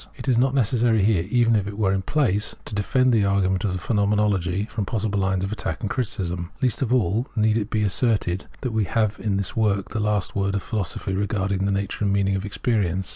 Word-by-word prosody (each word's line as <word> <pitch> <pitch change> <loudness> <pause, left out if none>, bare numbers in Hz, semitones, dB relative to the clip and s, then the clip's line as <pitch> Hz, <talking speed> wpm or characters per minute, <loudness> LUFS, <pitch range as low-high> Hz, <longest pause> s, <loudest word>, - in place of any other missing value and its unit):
It - - -8
is 130 - +3
not 130 +3 +2
necessary 115 -3 +2
here, 95 -5 +2
even 115 -1 +3
if 100 -2 0
it 100 0 -6
were 100 -3 +2
in 95 - 0
place, 105 -3 0
to - - -5
defend 125 +5 +2
the 110 -3 +3
argument 100 0 +1
of 95 - 0
the - - -2
Phenomenology 100 -1 +1
from 110 -1 -4
possible 105 -1 -1
lines 95 -1 0
of 95 - -3
attack 80 -6 -4
and 100 - -3
criticism. 90 -8 -2
Least 130 -2 0
of 125 -3 0
all 115 -1 +1
need 110 -1 +2
it 110 -1 -1
be 110 -1 0
asserted 100 -3 0
that 125 - -2
we 110 -2 +1
have 110 +1 0
in 100 -3 -1
this 100 -2 -3
work 100 -3 +1
the 110 - -3
last 105 -2 -1
word 100 0 0
of 100 - -2
philosophy 95 -2 -3
regarding 95 -1 -1
the - - +1
nature 100 +1 -2
and 100 - +2
meaning 100 0 +1
of 95 +1 -3
experience. 100 -4 -1
105 Hz, 230 wpm, -23 LUFS, 95-110 Hz, -, is